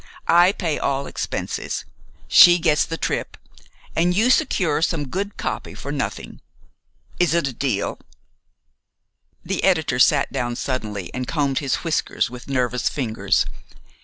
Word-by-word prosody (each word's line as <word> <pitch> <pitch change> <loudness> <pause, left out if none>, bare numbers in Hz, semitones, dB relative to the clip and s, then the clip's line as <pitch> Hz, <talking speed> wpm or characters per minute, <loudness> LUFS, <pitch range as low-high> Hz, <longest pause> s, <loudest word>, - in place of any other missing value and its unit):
I 175 +2 +6
pay 170 -6 -2
all 140 0 -1
expenses, - - -4 0.4
she 175 0 +8
gets 160 -3 +2
the 165 - -5
trip, - - -3 0.6
and 175 +2 +2
you 235 +4 +4
secure 180 - +1
some 160 -3 0
good 200 +5 -4
copy - - -4
for - - -6
nothing. - - -5 0.8
Is 175 -2 +3
it 170 -5 +1
a 130 - -4
deal?" 115 -5 -2 1.5
The 195 - -2
editor 160 -9 +2
sat - - +4
down 120 -1 -2
suddenly 105 -8 -4
and 125 -1 -4
combed 140 -4 0
his 140 -2 -2
whiskers 155 -7 0
with 125 0 -10
nervous 125 -2 0
fingers. 115 -6 0
145 Hz, 135 wpm, -22 LUFS, 125-175 Hz, 1.5 s, she